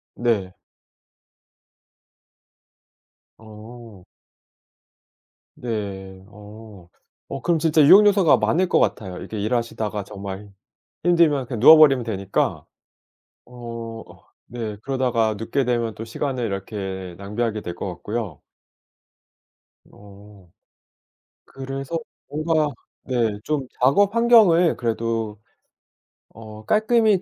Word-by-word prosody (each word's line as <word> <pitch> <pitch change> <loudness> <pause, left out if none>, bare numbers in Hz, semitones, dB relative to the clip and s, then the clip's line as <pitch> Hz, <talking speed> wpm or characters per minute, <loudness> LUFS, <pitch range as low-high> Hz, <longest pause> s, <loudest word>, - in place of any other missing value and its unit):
네. 105 -7 -1 2.9
어. 110 -2 -13 1.5
네. 95 -5 -6
어 105 -3 -14 0.4
어 135 - -5
그럼 170 -2 +1
진짜 155 -1 +3
유혹 200 +8 +8
요소가 195 -6 +4
많을 185 +2 +1
것 - - +3
같아요. 95 -4 -1
이렇게 110 - -7
일하시다가 110 -2 -2
정말 100 0 -8 0.8
힘들면 140 -4 -2
그냥 120 -2 -5
누워버리면 140 -2 +7
되니까. 100 -4 -2 0.8
어 120 -1 -9 0.3
어 - - -19 0.2
네 110 -4 -5
그러다가 125 -5 0
눕게 130 +5 -1
되면 120 -2 -1
또 110 - -8
시간을 130 +2 -3
이렇게 95 -3 -5
낭비하게 105 +2 -3
될 85 -3 -6
것 - - -5
같고요. 105 -5 -5 1.4
어 100 -2 -17 1.0
그래서 135 +4 -5 0.3
뭔가 155 0 0 0.4
네 115 -5 -1
좀 145 -4 -2
작업 195 - +3
환경을 220 -8 +5
그래도 115 -2 -3 0.9
어 110 -1 -12
깔끔히 220 - +3
115 Hz, 200 characters per minute, -22 LUFS, 105-135 Hz, 2.9 s, 유혹